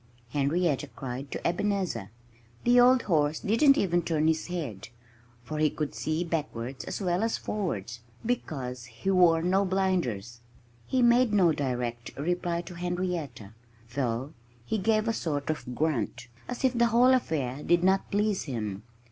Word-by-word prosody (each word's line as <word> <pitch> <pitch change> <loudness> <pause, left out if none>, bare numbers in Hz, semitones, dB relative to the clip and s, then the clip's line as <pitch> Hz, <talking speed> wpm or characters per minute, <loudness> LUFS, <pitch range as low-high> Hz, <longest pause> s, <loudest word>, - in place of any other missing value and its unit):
Henrietta 145 +2 0
cried 130 +2 -6
to - - -3
Ebenezer. 180 - -1 0.5
The 245 +1 +5
old 250 0 +6
horse 155 -4 +1
didn't 275 +7 +4
even 175 -3 +2
turn 160 -2 0
his 160 0 +1
head, 140 - -5 0.5
for 155 +5 -5
he 155 0 +4
could 150 0 -4
see 155 +2 -1
backwards 140 -7 -4
as - - -4
well 180 0 +1
as 225 0 0
forwards, 115 - -3 0.3
because 130 - -3
he 125 +11 -3
wore 170 -3 +5
no 190 +3 +3
blinders. 175 - -1 0.5
He 255 -1 +2
made 240 -1 +4
no 185 -5 +5
direct 120 -5 -3
reply 170 +3 -1
to 175 - -10
Henrietta, 175 - -3 0.4
though 130 +2 -2 0.3
he 220 - -1
gave 215 +2 +2
a 225 - +2
sort 145 -6 -2
of 125 -5 -6
grunt, 120 -5 -1 0.2
as 250 +1 -5
if 255 -1 +3
the 235 0 +4
whole 245 +3 +5
affair 145 - -1
did 175 +2 +2
not 190 +1 +2
please 205 -1 0
him. 105 -8 -4
165 Hz, 155 wpm, -28 LUFS, 130-195 Hz, 0.5 s, old